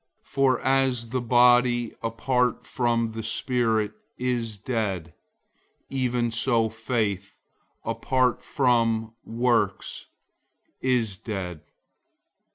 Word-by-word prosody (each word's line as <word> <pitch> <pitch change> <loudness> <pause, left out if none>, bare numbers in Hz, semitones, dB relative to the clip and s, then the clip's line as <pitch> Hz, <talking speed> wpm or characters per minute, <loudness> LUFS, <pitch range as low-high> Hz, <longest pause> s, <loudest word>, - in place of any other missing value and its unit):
002:026 - - -28
For 135 -2 +3
as 130 -3 +2
the 130 +1 -1
body 120 -1 +4
apart 125 +2 0
from 120 -2 0
the 110 0 -5
spirit 115 -2 0 0.3
is 120 -4 -2
dead, 100 - -3 0.8
even 125 -3 0
so 115 -1 +2
faith 110 -4 -2 0.5
apart 130 -2 +1
from 115 -4 +1
works 115 -4 0 0.7
is 120 -6 +1
dead. 90 -7 -5
120 Hz, 90 wpm, -25 LUFS, 110-125 Hz, 0.8 s, body